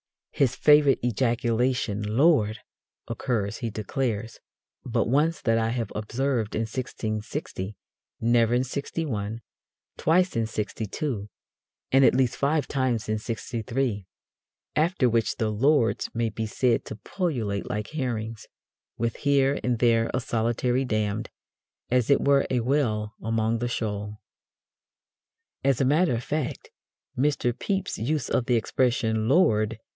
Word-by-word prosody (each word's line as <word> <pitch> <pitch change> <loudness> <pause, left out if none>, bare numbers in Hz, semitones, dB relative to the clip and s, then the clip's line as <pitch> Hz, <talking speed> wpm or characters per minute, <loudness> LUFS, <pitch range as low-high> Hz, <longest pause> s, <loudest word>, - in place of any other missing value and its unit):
"His 135 -4 +1
favourite 150 -2 +5
ejaculation, 120 -2 0
'Lord!' 110 0 +3 0.5
occurs," 115 -3 -2
he 115 - -3
declares, 110 0 -3 0.4
"but - - 0
once 150 +6 +2
that 115 -3 +2
I 110 0 +1
have 115 -3 -2
observed 115 +1 -1
in 110 - 0
1660, 110 - -4 0.4
never 115 0 +3
in 125 - +2
'61, 120 -5 -3 0.6
twice 180 +3 +2
in 115 -1 +1
'62, 110 +1 -3 0.6
and 135 +1 +5
at 130 - +5
least 130 -2 +2
five 145 0 +1
times 130 -5 -1
in 110 0 -1
'63; 115 -2 -3 0.7
after 155 -4 +2
which 115 -1 +1
the 110 -2 -1
'Lords' 120 +2 +2
may 115 -1 +1
be 110 +1 -4
said 120 +2 +1
to - - -6
pullulate 110 - -3
like 105 0 -3
herrings, 115 -6 -4 0.5
with 115 0 -1
here 140 -1 +2
and 125 -1 +1
there 115 -1 +3
a 125 - 0
solitary 120 +2 0
'damned,' 110 -3 -1 0.6
as 125 -2 +2
it 140 - +5
were 140 -1 +3
a 125 -2 +1
whale 115 -5 0
among 115 0 0
the 120 - -1
shoal." 105 -3 -3 1.5
As 135 -2 +2
a 135 - +3
matter 150 +1 +3
of 115 - -4
fact, 150 0 -3 0.4
Mr. 130 -2 +1
Pepys's 195 - -2
use 150 -5 0
of 125 - +1
the 125 - +3
expression 115 -1 +1
"Lord!" 115 - +3
120 Hz, 130 wpm, -26 LUFS, 110-135 Hz, 1.5 s, favourite